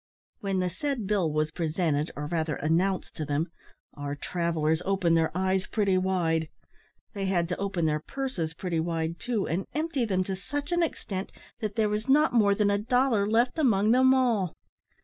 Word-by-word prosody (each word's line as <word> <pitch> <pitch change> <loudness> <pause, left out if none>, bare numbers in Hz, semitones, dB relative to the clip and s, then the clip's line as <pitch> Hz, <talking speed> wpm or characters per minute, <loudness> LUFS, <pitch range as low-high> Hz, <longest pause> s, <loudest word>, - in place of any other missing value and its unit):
When 195 -2 -1
the 180 - 0
said 260 - -2
bill 190 -6 +1
was 155 0 0
presented, 160 -2 0
or 150 - -4
rather, 160 -1 -1
announced 180 +5 0
to 155 - -2
them, 150 +3 -1 0.4
our 145 0 -4
travellers 160 0 0
opened 190 -4 +2
their 160 -1 +3
eyes 190 0 +1
pretty 200 -3 +1
wide; 170 -4 +1 0.6
they 195 -2 -2
had 175 -3 +1
to 180 - -2
open 195 -4 -1
their 155 -1 +1
purses 170 - -4
pretty 170 -1 -2
wide 165 0 -2
too, 235 -5 -1
and 180 +4 -2
empty 305 -4 0
them 190 -4 +1
to 190 +1 -3
such 290 - -5
an 345 0 +2
extent 195 - -3 0.3
that 215 -3 -3
there 220 -2 +2
was 210 +4 -2
not 300 +2 +4
more 205 -4 +4
than 205 0 +2
a 200 - +1
dollar 245 -3 +2
left 235 +7 +2
among 220 -7 +3
them 260 +2 +5
all! 235 -9 +2
190 Hz, 185 wpm, -28 LUFS, 165-220 Hz, 0.6 s, them